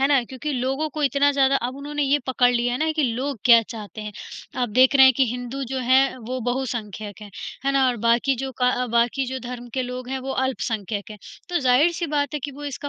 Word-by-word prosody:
है 270 Hz, -, +4 dB
ना? 280 Hz, -3 st, +4 dB
क्योंकि 265 Hz, +5 st, -5 dB
लोगों 270 Hz, +4 st, -1 dB
को 305 Hz, +2 st, -4 dB
इतना 285 Hz, 0 st, +3 dB
ज़्यादा 275 Hz, -1 st, +3 dB
अब 255 Hz, +2 st, -6 dB
उन्होंने 295 Hz, +1 st, -3 dB
ये 280 Hz, +1 st, +3 dB
पकड़ 250 Hz, -1 st, +3 dB
लिया 240 Hz, 0 st, 0 dB
है 245 Hz, -, -2 dB
ना 315 Hz, +1 st, +1 dB
कि 310 Hz, -, 0 dB
लोग 270 Hz, +2 st, -3 dB
क्या 235 Hz, -2 st, +8 dB
चाहते 215 Hz, -1 st, -9 dB
हैं? 210 Hz, 0 st, -6 dB, 0.4 s
आप 245 Hz, -1 st, 0 dB
देख 255 Hz, +5 st, +4 dB
रहे 265 Hz, -, +9 dB
हैं 260 Hz, -, +7 dB
कि 270 Hz, -, +4 dB
हिंदू 245 Hz, +2 st, -5 dB
जो 265 Hz, -, -1 dB
है 260 Hz, +2 st, +3 dB
वो 250 Hz, +2 st, -5 dB
बहुसंख्यक 225 Hz, -4 st, -4 dB
हैं। 205 Hz, -, -10 dB, 0.3 s
है 275 Hz, -, +2 dB
ना? 270 Hz, -1 st, +3 dB
और 245 Hz, -, -1 dB
बाकी 240 Hz, +4 st, +3 dB
जो 265 Hz, +2 st, -4 dB
क 250 Hz, 0 st, +2 dB
बाकी 240 Hz, +3 st, +1 dB
जो 260 Hz, +1 st, -4 dB
धर्म 245 Hz, -1 st, -7 dB
के 260 Hz, -, 0 dB
लोग 250 Hz, 0 st, -6 dB
हैं 265 Hz, 0 st, -2 dB
वो 270 Hz, -, -5 dB
अल्पसंख्यक 220 Hz, -6 st, -3 dB
हैं। 210 Hz, -, -9 dB, 0.3 s
तो 350 Hz, -, 0 dB
ज़ाहिर-सी 300 Hz, +7 st, +3 dB
बात 290 Hz, -1 st, -1 dB
है -, -, 0 dB
कि 290 Hz, -, -3 dB
वो 290 Hz, +2 st, -9 dB
इसका 285 Hz, 0 st, -5 dB
260 Hz, 240 wpm, -23 LUFS, 245-275 Hz, 0.4 s, रहे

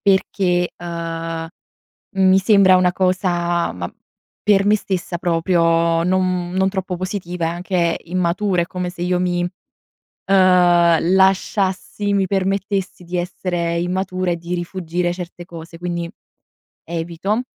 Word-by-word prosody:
Perché, 190 Hz, -2 st, +1 dB
ehm, 165 Hz, -1 st, -5 dB, 0.7 s
mi 190 Hz, 0 st, +5 dB
sembra 195 Hz, -2 st, +5 dB
una 180 Hz, -1 st, +3 dB
cosa 175 Hz, -2 st, 0 dB
ma 90 Hz, -1 st, -6 dB, 0.5 s
per 200 Hz, -1 st, +4 dB
me 210 Hz, -, +5 dB
stessa 185 Hz, -3 st, -3 dB
proprio 165 Hz, -1 st, +2 dB
non 180 Hz, -1 st, 0 dB
non 190 Hz, +1 st, +2 dB
troppo 190 Hz, -2 st, -3 dB
positiva 180 Hz, -2 st, -4 dB
e -, -, +1 dB
anche 175 Hz, 0 st, 0 dB
immatura, 180 Hz, +2 st, 0 dB
è -, -, -4 dB
come 180 Hz, 0 st, -4 dB
se 175 Hz, -1 st, -8 dB
io 180 Hz, 0 st, +1 dB
mi, 175 Hz, -1 st, 0 dB, 0.8 s
ehm, 175 Hz, -3 st, +4 dB
lasciassi 190 Hz, +1 st, +1 dB
mi 195 Hz, -1 st, +2 dB
permettessi 195 Hz, -1 st, -1 dB
di 180 Hz, +1 st, -3 dB
essere 175 Hz, -1 st, -2 dB
immatura 185 Hz, +1 st, -1 dB
e 170 Hz, -, +1 dB
di 170 Hz, +1 st, -4 dB
rifuggire 175 Hz, 0 st, -2 dB
certe 175 Hz, -1 st, -8 dB
cose. 165 Hz, -1 st, -10 dB
Quindi 170 Hz, -1 st, -4 dB, 0.7 s
evito 170 Hz, +6 st, -2 dB
180 Hz, 125 wpm, -20 LUFS, 170-190 Hz, 0.8 s, mi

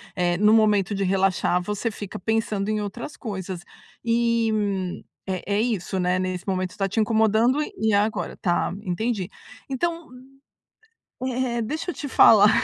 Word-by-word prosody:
eh, 175 Hz, -1 st, +1 dB
no 210 Hz, +2 st, +5 dB
momento 210 Hz, -3 st, +3 dB
de 195 Hz, -, -1 dB
relaxar, 190 Hz, -1 st, +2 dB
você 210 Hz, +4 st, -2 dB
fica 200 Hz, -3 st, -7 dB
pensando 215 Hz, -1 st, -1 dB
em 215 Hz, -1 st, 0 dB
outras 235 Hz, +8 st, -6 dB
coisas. 190 Hz, -6 st, -5 dB, 0.4 s
E 230 Hz, -1 st, +2 dB, 0.8 s
é 190 Hz, +2 st, -2 dB
é 210 Hz, -, +2 dB
isso, 195 Hz, -5 st, -1 dB
né. 180 Hz, +1 st, +1 dB
Nesse 185 Hz, +1 st, -3 dB
momento, 185 Hz, -1 st, -1 dB
está 195 Hz, -1 st, -1 dB
te 210 Hz, +4 st, -2 dB
incomodando 220 Hz, +5 st, +3 dB
e -, -, -4 dB
e 220 Hz, -1 st, +2 dB
a 200 Hz, +1 st, +5 dB
agora. 220 Hz, -, -4 dB
Tá. 175 Hz, -2 st, 0 dB
Entendi. 200 Hz, +1 st, -2 dB, 0.4 s
Então, 335 Hz, +4 st, -2 dB, 1.1 s
u 260 Hz, -, -2 dB
eh 250 Hz, -1 st, -1 dB
eh -, -, 0 dB
deixa 310 Hz, +10 st, -3 dB
eu -, -, -11 dB
te 285 Hz, -, -5 dB
falar 210 Hz, -5 st, +7 dB
210 Hz, 165 wpm, -24 LUFS, 190-230 Hz, 1.1 s, falar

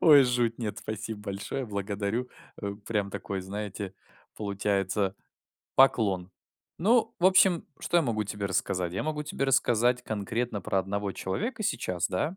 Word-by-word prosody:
Ой, 145 Hz, -4 st, +9 dB
жуть, 120 Hz, -2 st, +1 dB
нет, 110 Hz, -4 st, -3 dB
спасибо 110 Hz, 0 st, -5 dB
большое, 105 Hz, +6 st, -4 dB
благодарю, 100 Hz, +3 st, -2 dB, 0.3 s
э, 100 Hz, 0 st, -2 dB
прям 105 Hz, -3 st, 0 dB
такой, 95 Hz, 0 st, -4 dB
знаете, 100 Hz, 0 st, -5 dB, 0.4 s
получается 100 Hz, -1 st, 0 dB, 0.6 s
поклон. 100 Hz, -9 st, +4 dB, 0.5 s
Ну, 225 Hz, +4 st, +3 dB
в 175 Hz, -, +5 dB
общем, 185 Hz, -2 st, +5 dB
что 175 Hz, -, 0 dB
я 170 Hz, -, +5 dB
могу 110 Hz, -6 st, 0 dB
тебе 100 Hz, 0 st, -3 dB
рассказать? 90 Hz, -2 st, 0 dB
Я 95 Hz, -, -1 dB
могу 150 Hz, -1 st, -2 dB
тебе 145 Hz, -2 st, -2 dB
рассказать 125 Hz, -2 st, +3 dB
конкретно 110 Hz, 0 st, -2 dB
про 95 Hz, -, 0 dB
одного 100 Hz, +1 st, -1 dB
человека 215 Hz, -, -3 dB
сейчас, 90 Hz, -, 0 dB
да? 150 Hz, -, -1 dB
105 Hz, 145 wpm, -29 LUFS, 100-125 Hz, 0.6 s, Ой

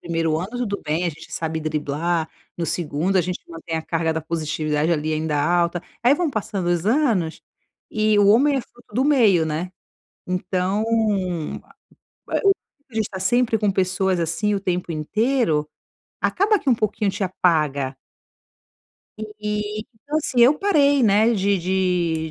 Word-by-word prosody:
1º 165 Hz, -2 st, -1 dB
ano 185 Hz, +5 st, -5 dB
tudo 240 Hz, -5 st, -3 dB
bem, 155 Hz, +4 st, -1 dB
a 175 Hz, -, +1 dB
gente 155 Hz, -, -10 dB
sabe 160 Hz, -1 st, -3 dB
driblar. 155 Hz, +2 st, -1 dB, 0.3 s
No 170 Hz, -, -2 dB
2º, 170 Hz, +3 st, -1 dB
a 185 Hz, -, +5 dB
gente 180 Hz, +1 st, -3 dB
mantém 165 Hz, 0 st, -5 dB
a 160 Hz, -, -3 dB
carga 165 Hz, 0 st, -1 dB
da 160 Hz, -, -2 dB
positividade, 155 Hz, -1 st, -1 dB
ali, 155 Hz, 0 st, -1 dB
ainda 155 Hz, -1 st, 0 dB
alta. 175 Hz, +2 st, +1 dB, 0.2 s
Aí 255 Hz, +4 st, +5 dB
vão 335 Hz, -2 st, 0 dB
passando 205 Hz, -5 st, -3 dB
os 175 Hz, +2 st, 0 dB
anos, 220 Hz, -, +1 dB, 0.5 s
e 215 Hz, -1 st, +2 dB
o 205 Hz, -, +5 dB
homem 275 Hz, +6 st, +5 dB
é -, -, +1 dB
fruto 240 Hz, -3 st, -19 dB
do 255 Hz, +4 st, +2 dB
meio, 220 Hz, -, +4 dB
né. 160 Hz, +4 st, -3 dB, 0.6 s
Então 185 Hz, +3 st, -1 dB, 1.4 s
a -, -, -3 dB
a -, -, -2 dB
o 395 Hz, -, +7 dB, 0.4 s
a -, -, -18 dB
gente 220 Hz, -2 st, 0 dB
tá 190 Hz, -, -6 dB
sempre 230 Hz, +4 st, +2 dB
com 210 Hz, -1 st, +1 dB
pessoas, 190 Hz, 0 st, 0 dB
assim, 170 Hz, +6 st, 0 dB
o -, -, -1 dB
tempo 180 Hz, -2 st, -2 dB
inteiro, 165 Hz, -, 0 dB, 0.5 s
acaba 410 Hz, +2 st, +2 dB
que 280 Hz, -, -5 dB
um 245 Hz, -, +6 dB
pouquinho 215 Hz, -1 st, 0 dB
te 195 Hz, +1 st, -2 dB
apaga. 150 Hz, -7 st, 0 dB, 1.4 s
E, 210 Hz, 0 st, -3 dB, 0.2 s
então 295 Hz, +1 st, -2 dB
assim, 255 Hz, -5 st, 0 dB
eu 260 Hz, +5 st, +7 dB
parei, 285 Hz, -9 st, +3 dB
né, 220 Hz, +2 st, +4 dB
de 200 Hz, -2 st, +1 dB
de 175 Hz, -3 st, 0 dB
185 Hz, 165 wpm, -22 LUFS, 160-220 Hz, 1.4 s, o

